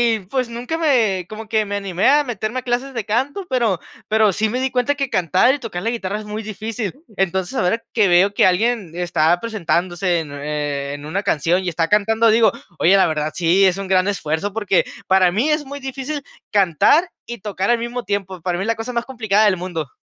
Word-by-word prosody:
y, -, -, -4 dB
pues, 255 Hz, -1 st, -1 dB
nunca 245 Hz, +7 st, -4 dB
me, 230 Hz, -, +2 dB
como 215 Hz, +2 st, -8 dB
que 220 Hz, -1 st, +1 dB
me 205 Hz, 0 st, -4 dB
animé 195 Hz, -2 st, 0 dB
a 295 Hz, +2 st, +5 dB
meterme 240 Hz, -1 st, -3 dB
a -, -, -7 dB
clases 250 Hz, +2 st, -2 dB
de 230 Hz, -4 st, -4 dB
canto, 270 Hz, -, -1 dB
pero 230 Hz, -9 st, +1 dB, 0.3 s
pero 215 Hz, -1 st, +3 dB
sí 220 Hz, +4 st, 0 dB
me 250 Hz, +4 st, -2 dB
di 265 Hz, 0 st, 0 dB
cuenta 255 Hz, +2 st, +1 dB
que 275 Hz, -2 st, -3 dB
cantar 185 Hz, -, +3 dB
y -, -, -8 dB
tocar 220 Hz, -8 st, -5 dB
la 225 Hz, -, -1 dB
guitarra 210 Hz, -3 st, -3 dB
es 215 Hz, -, -9 dB
muy 210 Hz, +1 st, -5 dB
difícil. 215 Hz, 0 st, -4 dB, 0.2 s
Entonces, 190 Hz, +4 st, -1 dB
ahora 225 Hz, +4 st, +1 dB
que 215 Hz, -4 st, +3 dB
veo 190 Hz, +3 st, +4 dB
que -, -, +4 dB
alguien 200 Hz, 0 st, +1 dB
está 175 Hz, -1 st, +1 dB
presentándose 180 Hz, -4 st, -1 dB
en, 155 Hz, -3 st, -6 dB
eh, 145 Hz, -1 st, -3 dB
en 145 Hz, 0 st, -8 dB
una 190 Hz, +6 st, -2 dB
canción 170 Hz, +4 st, +1 dB
y 180 Hz, -, -1 dB
está 165 Hz, -1 st, 0 dB
cantando, 220 Hz, +4 st, +3 dB
digo: 225 Hz, +1 st, +5 dB, 0.3 s
"Oye, 185 Hz, +5 st, +4 dB
la 190 Hz, -2 st, +4 dB
verdad, 155 Hz, -1 st, -2 dB
sí, 180 Hz, +3 st, +3 dB
es 185 Hz, -1 st, +2 dB
un 195 Hz, -1 st, -5 dB
gran 185 Hz, 0 st, +2 dB
esfuerzo", 195 Hz, 0 st, -2 dB
porque 205 Hz, -4 st, +1 dB, 0.2 s
para 190 Hz, -1 st, +4 dB
mí 230 Hz, -, +1 dB
es 300 Hz, -1 st, +1 dB
muy 285 Hz, +1 st, -7 dB
difícil 270 Hz, +2 st, -5 dB, 0.3 s
cantar 205 Hz, -, +3 dB, 0.2 s
y 240 Hz, -, -6 dB
tocar 195 Hz, 0 st, -3 dB
al 240 Hz, -, +3 dB
mismo 240 Hz, +1 st, -4 dB
tiempo. 195 Hz, -2 st, -3 dB
Para 175 Hz, 0 st, -1 dB
mí 190 Hz, -, -2 dB
es -, -, -4 dB
la 230 Hz, -, +1 dB
cosa 225 Hz, +3 st, -5 dB
más 235 Hz, 0 st, -1 dB
complicada 220 Hz, -5 st, +1 dB
del 205 Hz, -3 st, +4 dB
mundo. 170 Hz, -5 st, -4 dB
205 Hz, 225 wpm, -20 LUFS, 180-235 Hz, 0.3 s, a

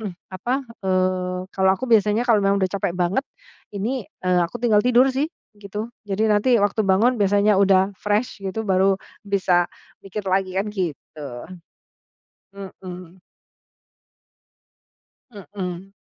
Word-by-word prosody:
eee, 200 Hz, -5 st, -6 dB, 0.2 s
apa, 250 Hz, +9 st, -2 dB, 0.2 s
eee, 185 Hz, -1 st, 0 dB
kalau 190 Hz, 0 st, +3 dB
aku 260 Hz, -, -5 dB
biasanya 220 Hz, -1 st, +3 dB
kalau 225 Hz, -4 st, +4 dB
memang 195 Hz, 0 st, +2 dB
udah, 190 Hz, -2 st, 0 dB
capek 180 Hz, -3 st, -2 dB
banget 185 Hz, +10 st, 0 dB, 0.5 s
ini, 225 Hz, +1 st, -3 dB, 0.2 s
eee, 180 Hz, -1 st, +3 dB
aku 170 Hz, +7 st, -1 dB
tinggal 215 Hz, -3 st, +5 dB
tidur 250 Hz, +3 st, +4 dB
sih 285 Hz, +4 st, 0 dB, 0.3 s
gitu. 210 Hz, +4 st, -6 dB, 0.2 s
Jadi 200 Hz, +2 st, -1 dB
nanti 220 Hz, +3 st, +3 dB
waktu 205 Hz, +1 st, +1 dB
bangun 220 Hz, +5 st, +3 dB
biasanya 200 Hz, 0 st, +3 dB
udah 195 Hz, 0 st, +4 dB
fresh 210 Hz, +1 st, -1 dB
gitu, 195 Hz, +3 st, -4 dB
baru 190 Hz, -1 st, +3 dB, 0.3 s
bisa 185 Hz, -3 st, +2 dB, 0.3 s
mikir 195 Hz, +1 st, -6 dB
lagi, 190 Hz, 0 st, 0 dB
kan 205 Hz, +2 st, -1 dB
gitu. 165 Hz, -5 st, -5 dB, 1.3 s
Mhm. 185 Hz, -2 st, -10 dB, 2.1 s
Mhm. 195 Hz, -3 st, -7 dB
195 Hz, 125 wpm, -22 LUFS, 185-215 Hz, 2.1 s, tinggal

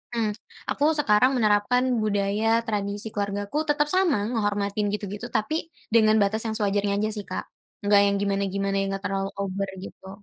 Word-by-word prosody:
mmm, 225 Hz, -2 st, +1 dB, 0.4 s
aku 295 Hz, +3 st, +2 dB
sekarang 250 Hz, -2 st, +4 dB
menerapkan 215 Hz, +3 st, +3 dB, 0.2 s
budaya 210 Hz, +2 st, +1 dB
tradisi 205 Hz, 0 st, -2 dB
keluargaku, 205 Hz, +7 st, -2 dB
tetap 295 Hz, 0 st, +2 dB
sama 335 Hz, -, +2 dB
ngehormatin 205 Hz, -2 st, 0 dB
gitu-gitu, 210 Hz, +2 st, -4 dB
tapi 305 Hz, +9 st, -1 dB, 0.3 s
dengan 220 Hz, -1 st, +5 dB
batas 215 Hz, +2 st, +1 dB
yang -, -, -1 dB
sewajarnya 200 Hz, -1 st, 0 dB
aja 215 Hz, +1 st, 0 dB
sih, 205 Hz, -, -5 dB
Kak. -, -, -4 dB, 0.4 s
Enggak 205 Hz, 0 st, +5 dB
yang -, -, 0 dB
gimana-gimana 195 Hz, 0 st, -1 dB
yang 195 Hz, 0 st, -1 dB
enggak 195 Hz, 0 st, -4 dB
terlalu 195 Hz, 0 st, -2 dB
over 195 Hz, 0 st, -2 dB
gitu. 190 Hz, 0 st, -10 dB
205 Hz, 160 wpm, -25 LUFS, 200-225 Hz, 0.4 s, dengan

